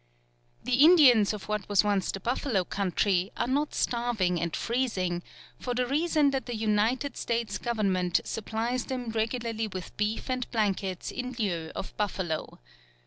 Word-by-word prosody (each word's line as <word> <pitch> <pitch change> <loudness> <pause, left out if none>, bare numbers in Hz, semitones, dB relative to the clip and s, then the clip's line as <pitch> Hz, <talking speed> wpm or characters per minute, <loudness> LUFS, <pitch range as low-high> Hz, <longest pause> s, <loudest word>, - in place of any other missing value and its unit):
The 255 +3 +4
Indians 275 - +7
of 210 -2 -6
what 210 -2 -3
was 205 -1 +4
once 200 -2 +1
the 195 - -5
buffalo 235 -1 0
country 190 +1 0
are - - +1
not 285 +4 0
starving 225 -8 0
and 170 -2 -2
freezing, 195 -8 -1 0.4
for 245 -1 -3
the 250 0 +1
reason 295 +1 +2
that 270 -1 -2
the 240 - -3
United 220 +6 +1
States 230 -3 -2
Government 195 -7 +1
supplies 225 +3 -2
them 250 -3 -4
regularly 225 0 -1
with 185 -3 -7
beef 210 +1 -1
and 255 -1 -2
blankets 195 -5 -1
in 250 0 -5
lieu 175 -8 -1
of - - -6
buffalo. 190 -6 -2
220 Hz, 150 wpm, -28 LUFS, 195-250 Hz, 0.4 s, Indians